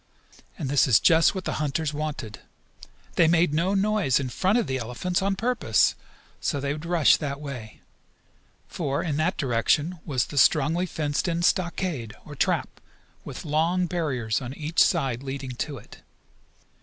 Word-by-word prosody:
And 155 - -4
this 140 -1 +3
is 120 -5 +5
just 165 +3 +4
what 190 - -4
the - - -2
hunters 150 +1 -1
wanted. 145 -8 -5 0.8
They 165 - +5
made 170 -1 +3
no 180 +6 +1
noise 200 -9 +2
in 130 -2 -3
front 190 - +1
of 240 - +1
the 130 -3 -2
elephants 125 +10 -2
on 195 0 0
purpose 230 - +2 0.5
so 140 - -1
they 140 +1 -2
would 155 +2 -7
rush 170 -4 +4
that 140 -2 -4
way. 125 -7 -8 0.9
For, 140 -5 -2
in 150 -4 -2
that 165 +4 0
direction, 145 +6 +1
was 130 -5 0
the 145 - -1
strongly 160 +7 +3
fenced 150 0 -2
in 170 0 -1
stockade, 175 - -1
or - - -9
trap, - - -1 0.4
with - - -8
long 165 +4 +1
barriers 135 - -2
on 130 +1 -6
each 155 +2 0
side 135 -8 +2
leading 135 -1 -5
to 140 +3 -4
it. 110 - -14
150 Hz, 165 wpm, -25 LUFS, 135-175 Hz, 0.9 s, is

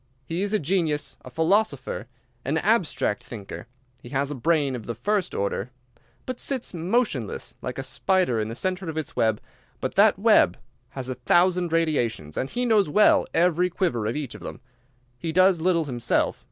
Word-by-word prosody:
He 165 +3 -3
is 200 0 -1
a 215 - +3
genius, 160 -3 -1
a - - -9
philosopher, 160 - 0 0.4
an 145 +4 0
abstract 180 - +1
thinker. 110 0 -8 0.3
He 120 - -11
has 140 +2 -1
a - - -2
brain 145 0 +1
of 115 -4 -8
the 120 - -3
first 195 - -1
order. 100 +2 -2 0.6
He 255 - -2
sits 260 -5 -2
motionless, 170 - -1
like 125 - -5
a 135 - -3
spider 135 -1 +1
in 110 - -1
the 115 - -6
centre 185 +3 -2
of 160 - -5
its 155 0 -4
web, 110 -3 +2 0.4
but - - -3
that - - +5
web 85 - +4 0.4
has 130 -1 -3
a 130 - -2
thousand 175 +7 +2
radiations, 120 - 0
and 130 - -2
he 245 +1 -2
knows 215 -7 +3
well 210 +7 +4
every 180 +1 +3
quiver 145 - -1
of 115 - -2
each 150 -4 -4
of - - -11
them. - - -7 0.6
He 165 +4 -3
does 185 0 +4
little 170 -2 +2
himself. 120 -4 0
160 Hz, 180 wpm, -25 LUFS, 125-185 Hz, 0.6 s, that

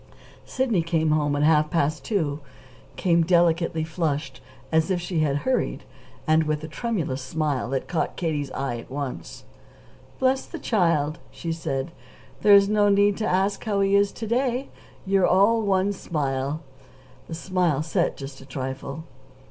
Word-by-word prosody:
Sidney 245 -9 +1
came 160 -1 +1
home 145 -1 +1
at 145 - +1
half 155 0 +4
past 155 -2 0
two 155 -9 -1 0.6
came 170 -2 +2
delicately 170 -1 +2
flushed, 150 -5 -3 0.3
as 160 +2 +2
if 185 -2 +1
she 175 -1 -2
had 150 -3 +1
hurried, 260 -1 0 0.4
and 155 0 +3
with 155 0 -1
a - - -4
tremulous 160 - -3
smile 140 -1 -2
that 135 0 -2
caught 170 - -1
Katie's 150 -5 -2
eye 135 -3 -2
at 115 - -12
once. 130 - -6 0.7
"Bless 260 0 +2
the 340 - -7
child!" 165 - +1
she 165 - -5
said. 160 -2 -3 0.5
"There's 200 -1 +7
no 205 0 +3
need 200 0 +4
to 220 - -1
ask 195 +2 +1
how 205 -3 0
he 195 0 +3
is 200 0 +3
to 225 - -6
day. 250 +3 0 0.4
You're 195 -1 +3
all 205 +5 +4
one 200 -1 +1
smile." 145 -4 -2 0.7
The 165 - -5
smile 170 -4 0
set 170 +2 0
just 135 -1 -8
a - - -12
trifle. 135 +3 -5
165 Hz, 155 wpm, -24 LUFS, 145-200 Hz, 0.7 s, There's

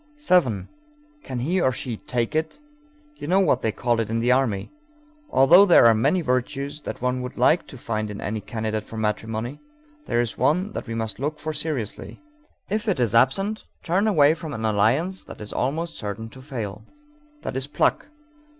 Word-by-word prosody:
7. 175 - +2 0.5
Can 130 -3 -5
he, 175 +8 +1
or 130 - +3
she, 120 0 -4
"take 120 +6 -3
it"? 160 - -1 0.6
You - - -7
know 185 +4 +4
what 130 -9 +3
they 110 - 0
call 120 +1 0
it 110 -2 -1
in 115 - -1
the 120 +2 +2
army. 125 -7 +1 0.6
Although 175 - +7
there 180 -10 +7
are 115 - +8
many 115 +12 +2
virtues 140 +2 -2
that 135 - -6
one 125 0 0
would 125 - -7
like 155 +7 +3
to 135 - -11
find 110 -2 -3
in 105 - -6
any 105 +1 -3
candidate 110 0 -3
for 110 - -9
matrimony, 110 +4 -3 0.5
there 120 - +1
is 120 -2 -1
one 175 - +2
that - - -6
we 115 - -4
must 110 -1 -3
look 150 +3 -2
for 155 +1 -4
seriously; 145 -9 -4 0.5
if 215 +2 -2
it 190 -9 +1
is 115 -4 +1
absent, 195 - +2 0.2
turn 190 +6 +1
away 155 -7 +5
from 160 -2 -7
an 110 - -3
alliance 115 - +1
that - - -11
is 105 -1 -6
almost 160 +6 -2
certain 105 +2 -5
to 130 - -13
fail. 115 -7 -6 0.6
That - - -4
is 135 +1 -1
pluck. 145 - +1
130 Hz, 190 wpm, -24 LUFS, 110-155 Hz, 0.6 s, are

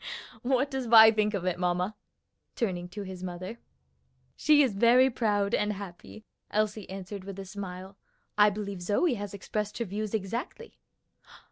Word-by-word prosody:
What 265 +3 +1
does 265 -2 -3
Vi 220 -1 +9
think 210 -1 +1
of 185 -2 -3
it, 180 -1 -1
mamma?" 180 +3 0 0.6
turning 180 -6 -2
to 205 +3 -6
his 185 -2 -8
mother. 185 +5 -6 0.8
"She 300 -1 +5
is 255 -6 +1
very 240 +5 +5
proud 205 -4 0
and 210 0 +1
happy," 200 +2 -10 0.2
Elsie 210 -1 -1
answered 195 +1 -7
with 195 0 -8
a 195 - -6
smile. 190 0 -8 0.4
"I 210 0 +6
believe 200 -2 -5
Zoe 210 - +1
has 205 -3 -5
expressed 210 +1 -4
her 235 - -2
views 210 +2 -3
exactly." 235 - -5
205 Hz, 155 wpm, -28 LUFS, 190-225 Hz, 0.8 s, Vi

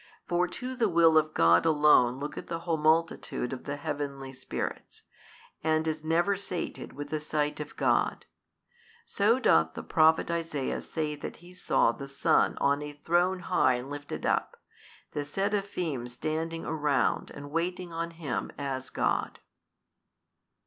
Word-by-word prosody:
For 175 +1 +2
to 250 +8 -5
the 235 -4 +1
will 165 -2 +5
of 155 0 +3
God 85 +1 +5
alone 150 -5 +4
looketh 145 +1 -6
the 165 0 -4
whole 170 -1 0
multitude 155 -5 +1
of 130 - -7
the 145 - -3
heavenly 145 -2 -4
spirits, 130 - -6 0.6
and 160 0 +1
is 155 -1 -2
never 170 +5 +2
sated 190 -2 -5
with 145 +1 -7
the 155 - -1
sight 150 0 -1
of 150 0 -7
God. - - +1 0.8
So 215 - +2
doth 80 - +3
the - - -5
Prophet 160 +1 +3
Isaiah 165 -5 -2
say 155 -2 -3
that - - -6
he 175 +2 -15
saw 180 -9 +2
the 140 +3 -8
Son 140 0 +2
on 140 +1 +2
a 150 0 -6
throne 175 +5 +1
high 150 -8 +3
and 125 +3 -6
lifted 145 0 -6
up, - - 0 0.5
the 145 - -2
Seraphin 180 - -2
standing 160 +6 -3
around 150 -4 0
and 145 0 -9
waiting 175 +2 -2
on 165 +1 -2
Him 155 -10 -4
as 135 -2 -4
God. - - -1
155 Hz, 150 wpm, -29 LUFS, 140-170 Hz, 0.8 s, will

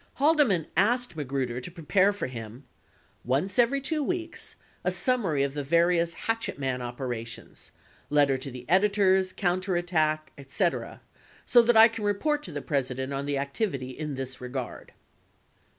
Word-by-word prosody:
Haldeman 275 - +3
asked 245 +2 +2
Magruder 130 -4 -3
to 125 - -6
prepare 185 +4 +2
for 205 - -4
him: 120 0 -8 0.6
once 145 - 0
every 245 +4 +4
2 300 +3 -1
weeks, 340 +3 -3 0.3
a - - +2
summary 200 - +1
of 140 -1 -2
the 145 -1 -3
various 170 +2 +2
hatchet 225 0 -1
man 130 -2 -2
operations 120 -2 -6 0.2
— - - -29
letter 145 -2 +3
to 130 +1 -5
the 125 -1 -10
editors, 190 0 +3
counterattack, 175 -5 0
etc, 140 +6 -2 0.4
so 240 - +7
that 235 0 +3
I 225 +1 +10
can 225 -1 -7
report 290 +9 0
to 180 - -8
the 145 -2 -5
President 130 -1 -2
on 140 +1 -3
the 145 -1 0
activity 140 - -2
in 150 +1 -5
this 130 -1 -6
regard. 125 0 -6
160 Hz, 150 wpm, -27 LUFS, 135-205 Hz, 0.6 s, I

